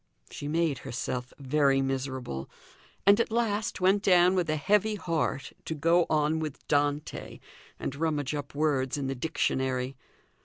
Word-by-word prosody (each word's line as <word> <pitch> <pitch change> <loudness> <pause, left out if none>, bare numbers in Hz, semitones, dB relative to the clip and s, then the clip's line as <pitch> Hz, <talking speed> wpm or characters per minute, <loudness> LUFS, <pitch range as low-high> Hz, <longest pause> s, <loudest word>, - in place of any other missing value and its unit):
She 145 - -6
made 160 -3 +1
herself 125 -1 -4
very 140 0 +2
miserable; 130 - -3 0.6
and 200 +2 +6
at 230 - +1
last 225 -1 0
went 190 +2 +3
down 180 -2 +5
with 180 -4 0
a 155 - +2
heavy 210 +7 +2
heart 165 -7 -2
to 160 - -3
go 165 +3 +3
on 155 +1 +2
with 155 -3 -6
Dante, 145 0 -1 0.4
and - - -3
rummage 150 -3 -1
up 145 -1 -5
words 140 -3 +1
in 140 - -2
the 135 - -1
dictionary. 130 -2 -1
150 Hz, 150 wpm, -28 LUFS, 135-175 Hz, 0.6 s, and